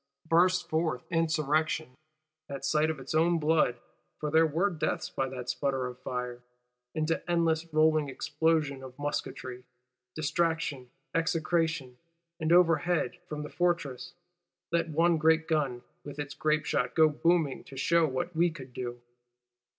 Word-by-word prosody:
Bursts 175 +2 +4
forth 160 -6 -1
insurrection, 155 -3 +1 0.6
at 140 -1 -5
sight 155 +1 +2
of 160 -3 -3
its 135 - -6
own 165 +2 +3
blood 155 -5 +2 0.4
(for 150 -1 -3
there 160 +1 +5
were 170 +7 +1
deaths 160 - -2
by 135 0 -1
that 125 -2 -7
sputter 130 +1 -1
of 125 0 -7
fire), 125 -1 -4 0.5
into 160 +1 0
endless 165 -1 +1
rolling 155 -1 +3
explosion 150 -1 0
of 130 -1 -10
musketry, 130 -3 -4 0.5
distraction, 155 -4 -1 0.2
execration;—and 165 0 -2
overhead, 175 -1 +3
from 150 -1 -4
the 150 - -7
Fortress, 175 -2 -1 0.6
let 170 0 +1
one 165 +2 +3
great 160 +1 +3
gun, 140 -6 0 0.2
with 145 0 -9
its 145 -1 -4
grape 155 -1 0
shot, 125 -3 0
go 160 -1 +7
booming, 155 -1 +1
to 135 - -11
shew 165 +4 +3
what 165 +6 -3
we 170 +2 +4
could 130 -6 -10
do. 120 -1 -5
155 Hz, 140 wpm, -29 LUFS, 135-165 Hz, 0.6 s, go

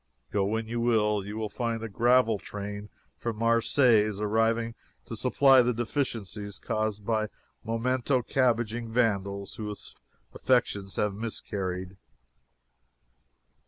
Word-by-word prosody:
Go 100 -1 +1
when 110 +2 -1
you 120 +1 -3
will, 105 -3 +2
you 105 +2 -4
find 115 +1 -3
a - - -3
gravel 115 0 +3
train 105 +1 -6 0.3
from 115 -2 -3
Marseilles 115 -2 +3
arriving 115 +2 +1 0.3
to 115 - -6
supply 130 +3 +5
the 125 -1 +1
deficiencies 110 -5 -3
caused 110 -1 -2
by 110 -1 +1 0.4
memento 125 +3 0
cabbaging 120 -2 +1
vandals 100 -4 0
whose 105 -2 -7 0.4
affections 100 -6 0
have 105 -1 0
miscarried. 95 -3 -4
110 Hz, 110 wpm, -28 LUFS, 105-120 Hz, 0.4 s, supply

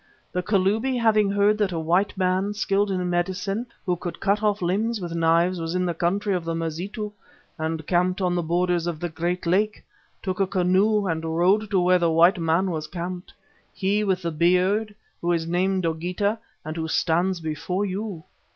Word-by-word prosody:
The 180 - -1
Kalubi, 210 +7 +1
having 215 -3 +3
heard 205 +1 +2
that 205 -3 +1
a 170 - -3
white 175 +6 +1
man 190 +2 0
skilled 200 0 +1
in 185 -2 -1
medicine 185 +5 -1 0.2
who 180 -2 +1
could 175 0 -6
cut 200 +2 +1
off 210 -1 +1
limbs 210 +6 0
with 175 -3 -5
knives, 170 +2 +2
was 165 +2 -3
in 180 0 +1
the 175 - 0
country 195 +5 0
of 180 -2 -1
the 165 0 -2
Mazitu 180 +7 -4 0.5
and 160 0 -3
camped 180 +2 +1
on 180 -2 +1
the 175 - +1
borders 175 +1 0
of 165 -3 -3
the 175 - -3
great 175 +3 -2
lake, 205 +5 +1 0.4
took 185 -1 -3
a 195 - +2
canoe 195 +3 +2
and 165 -3 -1
rowed 180 +6 +2
to 195 -3 +2
where 180 0 +4
the 170 -1 +2
white 170 +3 +5
man 165 +3 +1
was 155 -2 -3
camped, 175 +2 -6 0.4
he 200 +2 0
with 190 -3 0
the 170 - -1
beard, 185 +6 +2 0.3
who 175 +1 +1
is 165 -1 0
named 185 +2 0
Dogeetah, 180 +6 -1 0.3
and 155 +2 -5
who 160 0 -2
stands 175 +3 +1
before 170 +5 -2
you. 195 -3 -4
180 Hz, 190 wpm, -24 LUFS, 170-200 Hz, 0.5 s, white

